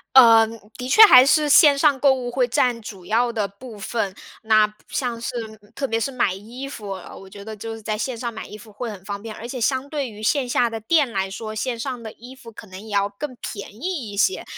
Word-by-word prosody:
呃， 230 -3 +8 0.3
的 250 +1 -6
确 440 +10 +8
还 255 -12 +9
是 300 +2 +3
线 290 -1 +7
上 280 -2 +3
购 275 -2 +5
物 245 -2 -4
会 250 -1 +1
占 235 -1 +1
主 195 -4 -10
要 235 +3 +1
的 215 -3 -1
部 215 +2 -12
分。 200 -2 -3 0.3
那， 215 -1 +4
不 210 - -10
像 245 -3 -3
是 - - -3 0.5
特 275 -1 -2
别 225 -1 -1
是 275 - -2
买 235 -7 0
衣 235 +8 -8
服， 215 -7 -8
呃， 185 -2 -10
我 195 - -12
觉 200 0 -11
得 220 0 -7
就 225 +2 -7
是 225 - -11
在 215 0 -2
线 235 +3 -3
上 235 0 -4
买 220 - -8
衣 210 - -10
服 215 0 -15
会 230 +3 -5
很 195 -2 -10
方 200 -1 -5
便。 220 -1 -8
而 235 - -8
且 250 -1 -6
相 260 +3 0
对 285 -4 -3
于 215 0 -11
线 255 +2 +1
下 245 - +2
的 225 0 -5
店 280 +4 +2
来 190 -1 -2
说， 215 +2 -6
线 235 +2 -3
上 250 0 -4
的 220 -2 -8
衣 245 +3 -13
服 245 -3 -13
可 220 - -12
能 185 +1 -10
也 220 - -12
要 200 0 +2
更 250 +7 -7
便 205 -5 -7
宜 300 - -3
一 200 - -8
些。 375 - +1
230 Hz, 275 characters per minute, -22 LUFS, 210-260 Hz, 0.5 s, 还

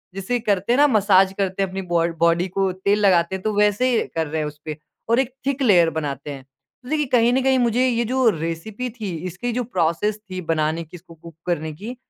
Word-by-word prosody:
जैसे 195 +6 -2
करते 205 0 0
हैं - - +2
ना 290 +1 +6
मसाज 195 -5 +4
करते 195 -1 -1
हैं 195 - -2
अपनी 190 +1 -4
बॉ 170 -1 +3
बॉडी 170 +2 +3
को 190 +1 0
तेल 200 +3 0
लगाते 175 -1 +3
हैं 190 - -6
तो 215 - 0
वैसे 210 +4 +3 0.2
कर 160 -1 0
रहे 155 +1 -2
हैं 150 - -2
उसपे 150 +1 -8 0.3
और 230 +2 +4
एक 265 -1 -1
थिक 275 0 -1
लेयर 180 -9 +5
बनाते 145 -2 -4
हैं। 135 -2 -8 0.4
तो 250 - -11
देखिए 300 -1 +1
कहीं 240 -1 +4
न 265 - +2
कहीं 265 -1 +3
मुझे 245 +1 +2
ये 235 -1 +1
जो 255 +1 +1
रेसिपी 165 +8 -4
थी 210 - -3 0.2
इसकी 190 +8 -4
जो 250 +1 -1
प्रोसेस 190 -1 0
थी 185 0 -5
बनाने 160 +1 0
की 160 +2 -14
इसको 170 0 -16
कुक 165 0 -14
करने 160 -3 -2
की 215 +11 -8
195 Hz, 230 wpm, -22 LUFS, 165-235 Hz, 0.4 s, ना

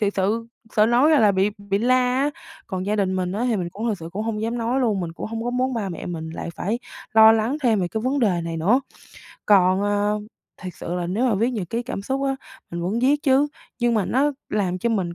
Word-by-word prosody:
thiệt 205 -1 +1
sự 215 +4 0 0.3
sợ 215 - +6
nói 245 +7 +4
ra 305 - +5
là 210 -2 +5
bị 190 +2 +2
bị 200 0 -1
la 245 +3 +3 0.3
á. 290 - +1 0.4
Còn 185 -2 -4
gia 210 +1 0
đình 190 -2 0
mình 185 0 -1
á, 220 +4 -1
thì 225 - +1
mình 175 -2 -2
cũng 215 +5 -5
thực 210 - -1
sự 165 - -7
cũng 210 - -3
hông 220 -1 -2
dám 230 +2 -2
nói 240 +3 0
luôn, 215 -6 +1
mình 170 -2 -4
cũng - - -6
hông 225 +1 -4
có 245 - -1
muốn 255 +1 0
ba 210 -4 -2
mẹ 170 - -6
mình 160 -2 -5
lại 165 - -6
phải 220 +6 -2 0.4
lo 220 0 +9
lắng 225 +6 +1
thêm 225 -5 +3
về 180 - -1
cái 220 - -3
vấn 260 +5 0
đề 190 -8 +2
này 165 -1 -4
nữa. 205 +11 +3 0.7
Còn, 190 -2 +5
ờ, 205 +1 +1 0.4
thiệt 180 -1 -6
sự 175 - -5
là 175 -1 -2
nếu 210 +8 0
mà 225 - +2
viết 230 +5 +1
nhật 205 -9 -4
ký 235 +1 -1
cảm 200 -5 -5
xúc 270 +5 -2
á, 270 0 0 0.3
mình 170 - -4
muốn 190 +7 -1
viết 285 +4 +2
chứ, 280 0 +3 0.3
nhưng 240 -1 +2
mà 210 -4 +2
nó 285 +3 +1 0.2
làm 190 -4 -1
cho 235 - 0
mình 185 -6 -1
215 Hz, 265 wpm, -23 LUFS, 190-240 Hz, 0.7 s, lo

